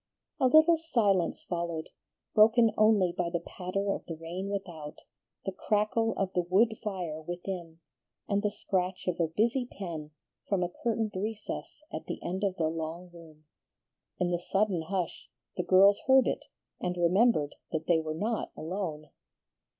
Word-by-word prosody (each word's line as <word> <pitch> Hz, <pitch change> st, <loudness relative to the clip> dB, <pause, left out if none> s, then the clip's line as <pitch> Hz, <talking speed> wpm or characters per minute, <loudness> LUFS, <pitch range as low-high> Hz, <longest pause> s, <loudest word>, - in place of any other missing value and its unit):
A 260 Hz, -, +5 dB
little 315 Hz, +4 st, +6 dB
silence 210 Hz, -, +1 dB
followed, 170 Hz, -2 st, -3 dB, 0.4 s
broken 225 Hz, +1 st, +6 dB
only 215 Hz, -4 st, +4 dB
by 175 Hz, -1 st, 0 dB
the 170 Hz, 0 st, -1 dB
patter 190 Hz, +3 st, -3 dB
of -, -, -3 dB
the 165 Hz, -, -4 dB
rain 175 Hz, +4 st, -5 dB
without, 175 Hz, -7 st, -5 dB, 0.5 s
the 195 Hz, -, -1 dB
crackle 215 Hz, +3 st, +1 dB
of 195 Hz, -1 st, -1 dB
the 180 Hz, -, +2 dB
wood 200 Hz, +6 st, +3 dB
fire 180 Hz, -7 st, -3 dB
within, 175 Hz, 0 st, -6 dB, 0.5 s
and 200 Hz, -1 st, +1 dB
the 210 Hz, -, +1 dB
scratch 190 Hz, -2 st, -2 dB
of 180 Hz, -, -1 dB
a 165 Hz, -, +3 dB
busy 235 Hz, +9 st, +1 dB
pen 165 Hz, -6 st, -5 dB, 0.4 s
from 195 Hz, -3 st, +2 dB
a 175 Hz, -, -1 dB
curtained 225 Hz, -2 st, 0 dB
recess 215 Hz, +8 st, -5 dB
at -, -, -5 dB
the -, -, -4 dB
end 190 Hz, +3 st, -3 dB
of 195 Hz, -2 st, +1 dB
the 160 Hz, -3 st, +1 dB
long 165 Hz, +2 st, -5 dB
room. 160 Hz, -2 st, -15 dB, 0.7 s
In 180 Hz, -1 st, +1 dB
the 175 Hz, -, +1 dB
sudden 195 Hz, 0 st, +1 dB
hush 180 Hz, +1 st, -3 dB, 0.3 s
the -, -, 0 dB
girls 195 Hz, +3 st, +6 dB
heard 265 Hz, -1 st, +7 dB
it -, -, -2 dB, 0.3 s
and 180 Hz, 0 st, -2 dB
remembered 175 Hz, -2 st, +3 dB, 0.2 s
that 160 Hz, -1 st, -2 dB
they 170 Hz, -2 st, +4 dB
were 155 Hz, -1 st, -3 dB
not 220 Hz, +7 st, -2 dB
alone. 160 Hz, -4 st, -4 dB
185 Hz, 160 wpm, -30 LUFS, 170-210 Hz, 0.7 s, heard